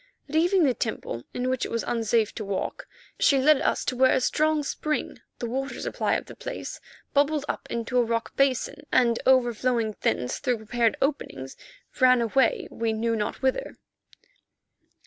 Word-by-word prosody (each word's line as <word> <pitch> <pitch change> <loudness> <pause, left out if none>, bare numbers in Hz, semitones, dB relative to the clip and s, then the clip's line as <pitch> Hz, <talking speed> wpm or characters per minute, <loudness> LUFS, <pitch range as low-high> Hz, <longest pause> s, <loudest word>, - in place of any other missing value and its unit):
Leaving 340 +5 +3
the 270 -4 +3
temple 220 - -4
in 250 +1 -2
which 255 -1 0
it - - -2
was 230 - -2
unsafe 225 -2 +1
to 220 - -5
walk, 200 -1 -4 0.3
she 275 - +4
led 285 +2 +4
us - - 0
to 255 - -1
where 260 +1 +5
a - - +3
strong 305 +3 +1
spring, 305 +2 -3 0.2
the - - -4
water 270 +4 -3
supply - - -1
of - - -3
the - - -10
place, - - -6 0.3
bubbled 290 +1 +2
up - - -4
into 235 +2 -1
a - - +4
rock 230 0 -2
basin, 275 +2 +1
and 235 -2 +3
overflowing 240 -3 +2
thence 125 - 0
through 250 -4 0
prepared 225 +1 0
openings, 270 - -3 0.4
ran 255 -1 +6
away 235 +2 +2
we 225 -1 -1
knew 230 +1 0
not 215 +4 -3
whither. 265 - -1
250 Hz, 165 wpm, -26 LUFS, 230-275 Hz, 0.4 s, ran